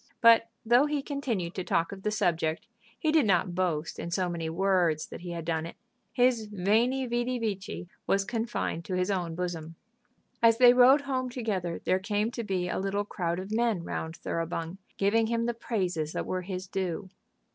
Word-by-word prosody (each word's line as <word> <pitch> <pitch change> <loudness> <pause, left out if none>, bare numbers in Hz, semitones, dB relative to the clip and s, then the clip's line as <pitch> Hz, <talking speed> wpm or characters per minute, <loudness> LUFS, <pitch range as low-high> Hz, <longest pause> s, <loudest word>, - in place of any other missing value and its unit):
But 230 -1 +6 0.2
though 245 +6 +5
he 295 -2 -1
continued 240 - -2
to 185 - -3
talk 165 0 0
of 195 -1 -8
the 210 - 0
subject, 165 -6 0 0.3
he 310 - +1
did 310 -7 +4
not 180 -1 +2
boast 170 -4 -1
in 170 - -4
so 180 +1 0
many 165 -2 -3
words 175 -3 +2
that - - -9
he 175 - -7
had 170 -2 -5
done 160 -1 -1
it. - - -10 0.4
His 245 -3 +2
"veni, 220 +7 +1
vidi, 240 +1 -1
vici," 195 -5 -4 0.2
was 195 0 +2
confined 225 -7 -2
to 185 - -3
his 180 +2 0
own 175 -4 -2
bosom. 165 -2 -4 0.7
As 230 -1 +6
they 245 0 +8
rode 255 +3 +7
home 260 -2 -2
together 205 -9 -3
there 185 - +2
came 210 +3 -1
to 235 - -4
be 185 -4 -1
a - - -2
little 195 +1 -1
crowd 175 -4 -2
of 190 +3 -6
men 225 -5 +1
round 160 -1 -4
Thoroughbung, 165 +2 -4 0.2
giving 220 +3 +3
him 230 0 0
the 240 - 0
praises 180 -9 -2
that - - -2
were 185 - -2
his 185 0 -5
due. 190 0 -3
195 Hz, 190 wpm, -29 LUFS, 175-230 Hz, 0.7 s, they